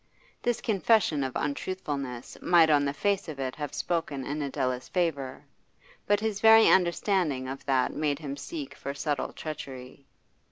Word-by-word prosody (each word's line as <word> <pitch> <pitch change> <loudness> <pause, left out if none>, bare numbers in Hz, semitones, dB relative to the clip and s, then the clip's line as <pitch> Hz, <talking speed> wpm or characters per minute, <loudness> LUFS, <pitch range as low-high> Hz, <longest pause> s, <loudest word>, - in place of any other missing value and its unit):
This 240 -1 0
confession 200 -8 +2
of 130 -1 -3
untruthfulness 140 -5 -4
might 165 -3 +5
on 145 -1 +4
the 140 - 0
face 195 +7 0
of 145 -3 -7
it 130 -1 -3
have 150 -2 -4
spoken 160 -6 -2
in 150 +2 -3
Adela's 130 -2 -2
favour; 155 -8 -2 0.6
but 205 0 +3
his 215 -2 -2
very 225 0 +8
understanding 175 -6 +2
of 135 +1 -6
that 130 -2 +2
made 150 -2 0
him 140 -2 -5
seek 295 - -6
for 140 - -6
subtle 145 -1 -2
treachery. 135 -3 -8
150 Hz, 155 wpm, -28 LUFS, 135-185 Hz, 0.6 s, very